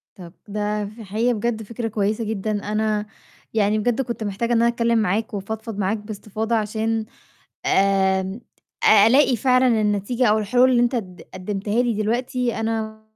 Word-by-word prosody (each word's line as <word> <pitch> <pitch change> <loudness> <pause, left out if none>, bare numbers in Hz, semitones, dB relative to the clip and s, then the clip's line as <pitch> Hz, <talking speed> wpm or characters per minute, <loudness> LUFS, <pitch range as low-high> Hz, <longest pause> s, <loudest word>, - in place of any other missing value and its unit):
طَب 175 -3 -11
ده 210 0 -2
في 215 +3 -10
الحقيقة 220 +5 0
بجد 225 0 -2
فكرة 230 +2 -4
كويسة 215 +1 -1
جدًا، 215 0 -2 0.2
أنا 215 -1 0 0.5
يعني 215 0 +2
بجد 240 +4 0
كنت 235 -3 -4
محتاجة 225 +4 -1
إن 230 - +3
أنا 235 - +4
أتكلّم 235 0 +1
معاك 220 +3 -1
وأفضفض 220 +2 -5
معاك 200 +2 0
بإستفاضة 215 +2 -4
عشان، 220 +1 -1 0.6
آمم، 190 +1 +2 0.4
أ 215 0 +7
ألاقي 265 +1 +4
فعلًا 250 -1 +3
النتيجة 210 +4 0
أو 215 - +4
الحلول 245 +5 +3
اللي 240 -1 +4
أنت 245 +1 +1
قد 185 -5 -5
قدّمتها 205 +4 -1
لي 240 -2 0
دلوقتي، 240 +3 -1
أنا 220 -1 -3
220 Hz, 160 wpm, -22 LUFS, 205-235 Hz, 0.6 s, أ